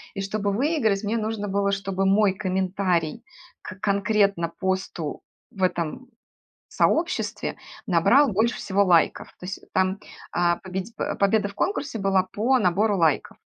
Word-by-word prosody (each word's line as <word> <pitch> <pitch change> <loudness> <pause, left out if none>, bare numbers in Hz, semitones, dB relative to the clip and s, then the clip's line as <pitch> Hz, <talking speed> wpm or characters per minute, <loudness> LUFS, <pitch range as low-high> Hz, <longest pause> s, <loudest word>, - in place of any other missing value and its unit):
И 195 - -3
чтобы 200 +1 -1
выиграть, 225 -5 +1
мне 215 +2 -1
нужно 215 -1 -3
было, 200 0 +1
чтобы 195 -1 -1
мой 195 0 +4
комментарий 185 -1 -1 0.4
к 185 - -9
конкретно 200 -3 +1
посту 185 -3 -3 0.3
в 195 - -10
этом 180 +7 -1 0.6
сообществе 340 +2 0 0.3
набрал 200 - +4
больше 225 +5 +1
всего 200 +1 +1
лайков, 175 -4 +2
то 180 - -7
есть 190 - -5
там, 190 +1 +1 0.3
а, 175 -1 +2
победи 190 +3 -6
а, - - -2
победа 205 +1 +2
в 200 - -12
конкурсе 280 - -2
была 195 -2 +2
по 220 +8 +1
набору 205 +1 +2
лайков. 160 -4 +1
195 Hz, 140 wpm, -24 LUFS, 185-215 Hz, 0.6 s, мой